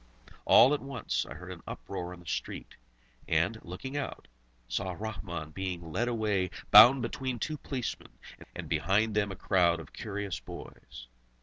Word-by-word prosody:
All 135 - +7
at 145 - -1
once, 135 0 -2
I 65 - -7
heard 90 +3 -9
an 90 -2 -9
uproar 90 +9 -5
in 90 -1 -10
the - - -17
street, - - -5 0.5
and, 85 +8 +1
looking 95 +11 -7
out, 145 -2 -4 0.4
saw 90 +10 -2
Rahmun 85 -7 -6
being 90 -3 -4
led 120 +9 0
away 105 -6 0 0.2
bound 120 +5 +10
between 125 +1 -3
two 155 +5 -3
policemen, 130 -4 -5 0.4
and - - -6
behind 105 +4 +1
them 105 -1 +1
a - - -5
crowd 85 -2 +2
of 75 -2 -11
curious 100 -6 -4
boys. - - -10
95 Hz, 160 wpm, -30 LUFS, 85-115 Hz, 0.5 s, bound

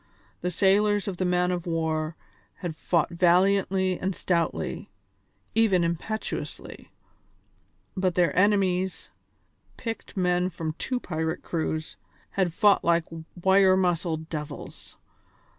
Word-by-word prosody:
The 180 - -1
sailors 205 +3 +2
of 190 -3 -3
the 185 - 0
man 180 0 +2
of 175 -1 -3
war 160 -1 -1 0.4
had 175 -3 -5
fought 165 0 0
valiantly 185 +1 +3
and 190 0 -2
stoutly, 170 -3 -1 0.6
even 215 -6 +3
impetuously, 170 +6 -4 1.1
but 185 -2 0
their 175 -4 +2
enemies 190 -2 +1 0.7
picked 225 -3 -6
men 180 0 +2
from 165 -3 -4
two 255 -1 -1
pirate 160 -4 -3
crews 160 -1 -3 0.3
had 185 -3 0
fought 205 +4 +4
like 170 -1 +2 0.3
wire 190 +1 +5
muscled 170 -3 0
devils. 150 -3 -7
180 Hz, 110 wpm, -26 LUFS, 165-190 Hz, 1.1 s, wire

